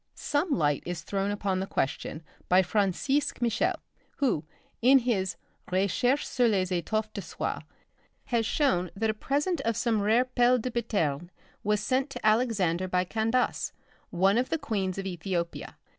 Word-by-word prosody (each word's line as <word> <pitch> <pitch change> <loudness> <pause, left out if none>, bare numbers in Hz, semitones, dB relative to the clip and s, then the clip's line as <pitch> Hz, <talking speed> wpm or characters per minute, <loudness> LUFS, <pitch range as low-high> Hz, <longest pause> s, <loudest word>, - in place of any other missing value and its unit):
Some 295 +5 -1
light 145 - +1
is 175 -2 -5
thrown 195 +1 -1
upon 200 -2 -1
the 190 - -3
question 145 +2 -2 0.3
by 185 +1 +6
Francisque 205 +9 0
Michel 235 -1 +1 0.4
who 245 - +1 0.4
(in 260 +3 +7
his 200 -8 0 0.3
'Récherches 200 +9 +1
sur 245 -2 +2
les 190 -4 +1
Etoffes 215 +5 -1
de 200 - -4
Soie') - - -4 0.6
has 235 -2 0
shown 220 - +1
that 220 +2 +1
a - - -6
present 285 +8 -1
of 230 -3 -1
some 225 -4 +1
rare 225 +5 +3
pailes 250 -1 +3
de 255 - -3
Biterne 175 - -1 0.3
was 210 0 +1
sent 265 +2 0
to 275 - -7
Alexander 210 -6 +2
by 180 0 +1
Candace, 225 +6 0 0.4
one 195 +5 +3
of 255 - -1
the 325 - +1
queens 200 - -2
of 195 - -4
Ethiopia. 175 -1 -4
215 Hz, 160 wpm, -28 LUFS, 185-245 Hz, 0.6 s, in